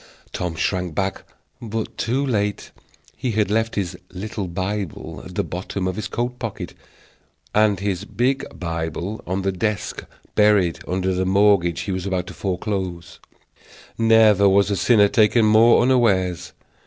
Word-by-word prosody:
Tom 90 -2 -3
shrank 90 -1 -2
back, 95 0 -2 0.4
but 115 -1 -4
too 130 +4 -1
late. 105 -5 -1 0.4
He 125 -3 -3
had 105 -1 +1
left 115 +1 0
his 95 -4 -2 0.2
little 100 +1 -5
Bible 95 0 -4
at - - -11
the - - +1
bottom 95 +1 -4
of 95 - -2
his 105 -1 -4
coat 120 +5 -3
pocket 115 -4 -5 0.8
and 105 -3 +3
his 95 -3 -2
big 125 +6 0 0.2
Bible 85 +4 -4
on 95 +2 -2
the 95 - +1
desk 105 +1 -3 0.3
buried 105 -5 +3
under 95 +1 0
the 90 +1 0
mortgage 95 -3 +3
he 100 - -4
was 95 0 -3
about 95 -2 -1
to - - -9
foreclose: 90 -3 -4 0.8
never 110 -3 +5
was 100 0 +2
sinner 105 -4 +5
taken 110 +2 +3
more 110 +3 +6
unawares. 95 -9 +1
100 Hz, 145 wpm, -22 LUFS, 90-110 Hz, 0.8 s, more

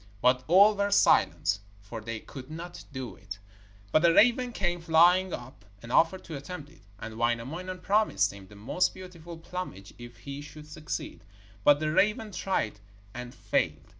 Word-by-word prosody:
But 125 +3 +3
all 200 +5 +6
were 200 0 0
silent, 100 - +3 0.2
for 105 +3 -8
they 115 +1 -5
could 130 -1 -10
not 170 +3 -8
do 130 -3 -6
it. 100 -2 -9 0.5
But 155 - +3
a 170 - +6
raven 245 +7 +4
came 175 -5 -1
flying 175 +3 +4
up 130 -4 -8 0.2
and 115 - -8
offered 185 +7 +3
to 160 - -7
attempt 150 +1 -8
it, 165 - -21 0.2
and 110 +2 -8
Wainamoinen 140 +11 -2
promised 210 - +2
him 100 -1 -12
the 105 - -15
most 120 - 0
beautiful 175 -3 -10
plumage 165 - -7
if 120 0 -11
he 140 0 -7
should 150 +1 -11
succeed, 155 -9 -6 0.4
but 145 0 +6
the 155 0 -1
raven 210 +5 +1
tried 175 - -2 0.3
and 125 0 -8
failed. 90 -8 -1
155 Hz, 165 wpm, -28 LUFS, 120-180 Hz, 0.5 s, all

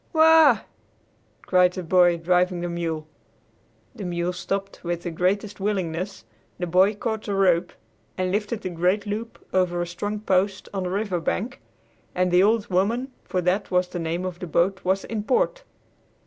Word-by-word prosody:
"Whoa!" 320 -5 +6 0.8
cried 180 -1 +4
the 185 - -5
boy 175 0 +4
driving 180 +1 +1
the 175 - -2
mule. 165 -2 -3 0.9
The - - -8
mule 175 0 -2
stopped 195 +2 -4
with 175 -1 -3
the 175 - -3
greatest 195 +4 -1
willingness, 190 - -2 0.3
the 180 - -2
boy 185 +4 +3
caught 220 0 -3
the 205 - -2
rope 180 -3 +3 0.5
and 185 -1 0
lifted 210 +2 -2
the 185 - -4
great 180 +4 +1
loop 215 +3 -4 0.2
over 180 -2 +1
a 175 - 0
strong 205 +5 -4
post 195 -1 0
on 195 - -2
the - - -2
river 195 -1 -1
bank, 230 +9 -3 0.5
and 180 0 +1
the 180 +1 +5
"Old 215 +1 +3
Woman" 225 +8 0
for 180 - -1
that 185 +3 0
was 180 0 +1
the 180 - -5
name 165 +2 -2
of 180 -1 -5
the 180 - -5
boat 180 +4 +1
was 190 +1 +1
in 225 -2 -3
port. - - +1
185 Hz, 175 wpm, -24 LUFS, 175-205 Hz, 0.9 s, Whoa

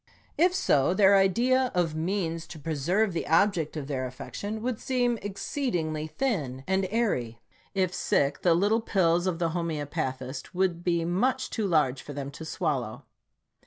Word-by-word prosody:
If 355 +4 +3
so, 150 - +2
their 200 -1 +6
idea 245 +7 +3
of 170 -3 +1
means 165 0 -2
to 160 - -9
preserve 165 +7 0
the 170 - -3
object 165 -1 +2
of 145 - -4
their 130 -2 -2
affec 125 +1 -10
tion 215 +2 -4
would 250 -2 -2
seem 245 -3 0
exceedingly 180 - -2
thin 155 - -2
and 190 0 +1
airy. 130 - -1 0.4
If 185 -2 +1
sick, 140 -6 +1
the 170 -2 +4
little 205 +6 +2
pills 175 -4 +2
of 180 -3 0
the 170 -1 0
homeopathist 145 -4 -4
would 180 -2 0
be 170 -2 +1
much 245 +10 0
too 220 -3 -1
large 150 -7 +2
for 145 - -8
them 140 0 -5
to 150 - -9
swallow. 150 - -2
175 Hz, 160 wpm, -27 LUFS, 150-205 Hz, 0.4 s, their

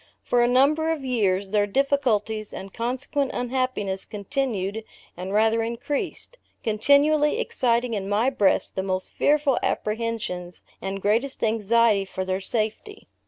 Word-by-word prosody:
For 245 - +2
a 240 - +4
number 285 +6 +3
of 300 -4 -3
years 200 -6 +1
their 205 0 +2
difficulties, 220 -4 0
and 195 0 -8
consequent 260 +4 -1
unhappiness, 245 -6 -1
continued 220 -2 -3 0.3
and 185 +2 -6
rather 220 +2 +3
increased, 235 - -3 0.2
continually 285 - +3
exciting 240 - 0
in 200 -2 -3
my 220 +6 +2
breast 205 -7 +1
the 190 - 0
most 185 -1 -3
fearful 290 -2 +2
apprehensions, 210 -5 -3 0.2
and 195 0 -4
greatest 230 +7 0
anxiety 220 -1 +3
for 190 0 -4
their 185 +1 -2
safety. 220 - -4
225 Hz, 130 wpm, -24 LUFS, 200-265 Hz, 0.3 s, a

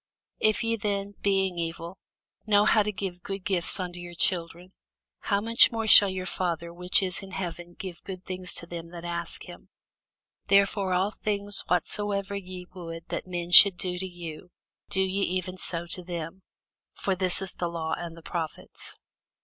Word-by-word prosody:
If 215 +2 +2
ye 230 0 0
then, 200 -1 -2
being 195 -3 +1
evil, 170 +2 -5 0.5
know 205 -1 +4
how 215 0 +5
to 210 +1 -1
give 190 -3 -5
good 195 0 -6
gifts 185 0 +1
unto 180 -1 -5
your 175 0 -9
children, 175 0 -1 0.5
how 200 -1 0
much 230 +2 +5
more 225 -1 -2
shall 205 -2 +9
your 185 -1 -4
Father 170 -2 -3
which 180 +3 +2
is 185 +1 +1
in 195 - -10
heaven 175 -2 -6
give 185 -3 -8
good 185 -2 -8
things 185 0 -3
to - - -3
them 170 -1 -8
that 170 0 -9
ask 170 -1 -4
him? - - -13 0.8
Therefore 200 -1 +3
all 190 +3 +1
things 205 -1 -1
whatsoever 200 +2 -1
ye 185 -2 -7
would 165 -2 -9
that - - -4
men 175 -1 -4
should 180 +1 +11
do 180 0 -2
to 190 - -4
you, 175 -1 -9 0.4
do 190 - +2
ye 190 +1 -1
even 185 -1 -2
so 170 -1 -2
to 180 +1 -4
them: 175 +1 -6 0.5
for 195 - -1
this 185 -1 0
is 195 -1 -4
the 175 - -3
law 165 -1 -3
and 170 -1 -7
the 165 - -13
prophets. 165 -3 -6
185 Hz, 180 wpm, -27 LUFS, 175-200 Hz, 0.8 s, should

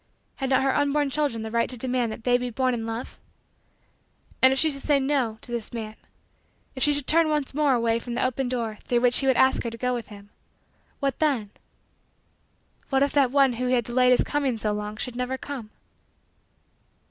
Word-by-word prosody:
Had 270 -2 -2
not 265 0 +3
her 270 -1 +1
unborn 290 0 +1
children 270 -6 -1
the 220 - -6
right 235 0 +1
to 250 - -4
demand 245 -1 0
that 220 - -8
they 245 +1 +3
be 250 0 -3
born 255 +2 0
in 225 -1 -3
love? 225 +2 -6 1.2
And 260 - +7
if 265 - 0
she 315 +2 +4
should 275 -1 -7
say, 290 -1 +2
"no," 265 -5 0
to - - -7
this 235 -3 -3
man 220 -2 -6 0.8
if 260 - -8
she 295 - +4
should 290 -2 -1
turn 325 +1 +3
once 295 -3 -1
more 290 -2 +2
away 230 -1 +1
from 235 0 -6
the - - 0
open 255 0 -1
door, 230 -4 -3
through 240 -1 0
which 245 0 +4
he 270 - -1
would 265 - +3
ask 260 0 +4
her 235 - -3
to 230 - -9
go 250 +2 -1
with 240 -2 -4
him 205 -1 -13 0.7
what 275 -1 -1
then? 260 -10 0 1.4
What 270 0 +3
if 280 - 0
that 275 -3 +3
one 275 -1 +3
who 250 +2 -2
had 250 -1 +2
delayed 250 +2 +2
his 250 - +4
coming 280 -5 -1
so 215 -1 -1
long 210 +1 -5
should 245 +1 -4
never 250 +1 -2
come? 260 -6 -7
250 Hz, 215 wpm, -25 LUFS, 230-275 Hz, 1.4 s, And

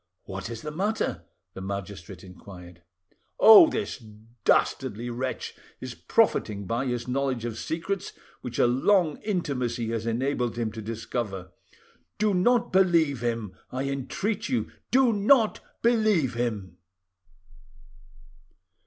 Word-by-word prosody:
"What 95 +2 -6
is 115 -1 -7
the 150 - -4
matter?" 205 +8 -2 0.3
the 95 - -8
magistrate 100 -2 -6
inquired. 90 -2 -13 0.6
"Oh! 220 +9 +10
this 215 - -3 0.5
dastardly 120 +4 +1
wretch 130 +2 -4 0.3
is - - -6
profiting 100 -2 +1
by 120 +7 -1
his 120 -1 -3
knowledge 130 -2 -1
of 115 -2 -4
secrets 170 - -3 0.3
which 120 -1 -6
a - - +4
long 155 +6 +2
intimacy 125 - -2
has 115 0 -3
enabled 120 0 -1
him 115 -2 -1
to 110 0 -7
discover. 110 -4 -5 0.7
Do 215 -1 +2
not 235 +5 +2
believe 165 - +3
him, 115 -5 -3 0.2
I 130 +1 -2
entreat 195 - -3
you, 255 - -1 0.2
do 255 -2 +4
not 215 +2 +3 0.2
believe 215 - +3
him!" 115 -5 -3
125 Hz, 120 wpm, -26 LUFS, 110-185 Hz, 0.7 s, Oh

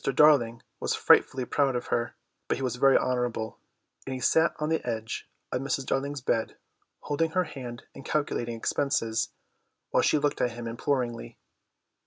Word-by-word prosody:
Darling 130 -5 +4 0.2
was - - 0
frightfully 130 -1 +4
proud 135 0 +1
of 120 - -2
her, 120 0 -1 0.3
but - - 0
he 135 - -4
was 125 -1 -1
very 135 +1 +6
honourable, 120 -3 -1 0.5
and 130 - -3
he - - -5
sat 160 +5 +3
on 150 0 -2
the 160 - 0
edge 115 -1 -4 0.2
of 125 - -1
Mrs. 135 0 -1
Darling's 140 +1 -1
bed, 115 -3 -1 0.4
holding 155 +3 0
her 185 - +3
hand 125 -7 -8
and - - -10
calculating 120 -6 -1
expenses, 115 -2 0 0.6
while - - +4
she - - +3
looked 145 0 0
at 120 - +1
him 120 0 -7
imploringly. 120 - -2
130 Hz, 165 wpm, -28 LUFS, 120-140 Hz, 0.6 s, very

